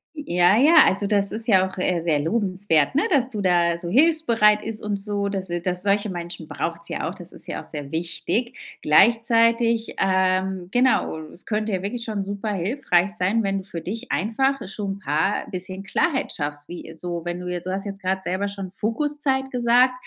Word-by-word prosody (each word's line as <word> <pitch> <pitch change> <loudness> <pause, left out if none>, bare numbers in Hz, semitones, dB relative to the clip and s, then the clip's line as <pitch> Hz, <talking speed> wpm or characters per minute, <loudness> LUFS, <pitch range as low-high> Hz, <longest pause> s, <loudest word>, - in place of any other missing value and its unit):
Ja, 185 - +3
ja, 300 +7 +5
also 200 +1 +1
das 200 -1 +1
ist 220 +1 -5
ja 190 -4 +4
auch, - - -13
äh, 180 -2 0
sehr 165 -3 +1
lobenswert, 185 - +1
ne, 295 - +3
dass 260 -3 +3
du 215 -5 -4
da 175 -2 +2
so 170 0 -6
hilfsbereit 235 - +4
ist 220 -1 -6
und 205 -1 -2
so, 200 -1 -2
dass 190 -2 -4
wil 175 0 -2
dass 180 0 -3
solche 205 +1 +1
Menschen 170 -2 -6
braucht's 170 +1 -4
ja - - -3
auch, - - -4
das - - -11
ist - - -10
ja - - -4
auch - - -12
sehr 145 -2 -7
wichtig. 175 +8 -2 0.2
Gleichzeitig, 230 +5 +3
ähm, 185 -1 +1
genau 245 -9 +2
es 175 - -14
könnte 215 0 -1
ja 185 -1 -2
wirklich 230 +4 -3
schon 210 -3 -3
super 200 +2 -4
hilfreich 190 -1 +1
sein, 210 +5 +1
wenn 195 0 0
du - - -9
für 170 -4 -6
dich 230 +6 -6
einfach 265 +8 +1
schon 195 -1 -4
paar 160 +2 0
bisschen 185 +1 -5
Klarheit 285 - 0
schaffst, 145 -1 -5
wie, 170 -2 -9
so 175 0 -5
wenn 175 +1 -4
du 180 - -7
jetzt 180 0 -4
du - - -2
hast 195 +1 -3
jetzt 200 -1 -7
grad 190 +1 -1
selber 190 +3 -1
schon 195 -2 -7
Fokuszeit 265 +5 -1
gesagt, 245 +1 +4
195 Hz, 200 wpm, -23 LUFS, 180-230 Hz, 0.2 s, ja